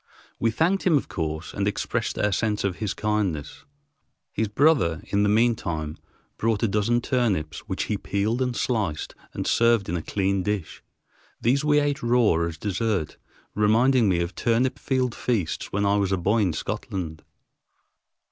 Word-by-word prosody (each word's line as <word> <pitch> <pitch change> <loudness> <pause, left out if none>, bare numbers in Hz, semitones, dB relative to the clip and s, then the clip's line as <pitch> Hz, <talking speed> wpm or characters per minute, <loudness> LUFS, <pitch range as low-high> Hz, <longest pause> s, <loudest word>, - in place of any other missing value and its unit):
We 115 - +2
thanked 165 - +1
him, 170 -5 +4
of - - -3
course, 80 -1 -4
and 100 0 -1
expressed 105 - -2
our 105 - +1
sense 105 +1 0
of 95 -3 -1
his 105 -3 -3
kindness. 105 -8 -2 0.7
His 110 +1 -1
brother, 110 - +2
in 100 - +2
the 105 - +3
mean 115 +3 +4
time, 80 -7 -4 0.4
brought 115 -1 +1
a - - +4
dozen 105 +4 +1
turnips, 100 - 0
which 95 - -1
he 105 -3 -2
peeled 105 +5 -1
and 125 -1 0
sliced 105 -13 -1 0.2
and - - -3
served 115 -5 +3
in 85 - -1
a 85 - -2
clean 95 +2 0
dish. 105 -3 -3 0.6
These 135 +5 +2
we 150 -1 +4
ate 145 0 0
raw 120 -4 +3
as 80 -1 -6
dessert, 100 -2 -2 0.4
reminding 115 +2 +3
me 85 -2 +2
of 85 +2 -3
turnip 125 +3 +1
field 130 -3 0
feasts 110 -11 -2
when 100 +1 0
I 100 +1 +3
was 100 -2 0
a 95 - +2
boy 100 +6 +1
in 95 -6 +1
Scotland. 80 -3 -4
105 Hz, 170 wpm, -25 LUFS, 95-120 Hz, 0.7 s, him